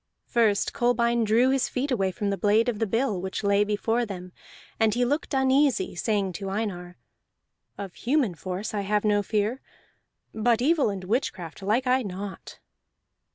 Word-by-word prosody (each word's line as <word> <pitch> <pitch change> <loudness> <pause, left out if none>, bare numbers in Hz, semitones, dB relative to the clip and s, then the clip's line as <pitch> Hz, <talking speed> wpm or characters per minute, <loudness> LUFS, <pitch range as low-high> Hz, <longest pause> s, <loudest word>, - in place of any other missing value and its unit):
First 220 -4 +1
Kolbein 235 -1 +2
drew 235 +5 +4
his 270 -1 +1
feet 270 +2 -2
away 195 -6 +1
from 205 +1 -2
the 200 - -1
blade 215 +4 +3
of 230 -4 -1
the 225 - 0
bill 225 -3 0
which 190 +3 -4
lay 200 0 +3
before 225 +3 0
them; 185 -4 -7 0.5
and 220 -1 +3
he 245 0 +2
looked 290 +2 -1
uneasy, 265 -5 +2
saying 200 0 -1
to 195 - -3
Einar: 185 -4 -4 0.8
"Of 195 -3 -6
human 255 - 0
force 185 +6 -5
I 205 - -1
have 210 +2 0
no 205 -1 +3
fear, 215 +5 -1 0.7
but 230 +1 +2
evil 290 -1 +3
and 195 -2 -5
witchcraft 185 - -3
like 215 +7 +1
I 255 +1 +3
not." 195 -2 -7
215 Hz, 165 wpm, -26 LUFS, 195-245 Hz, 0.8 s, drew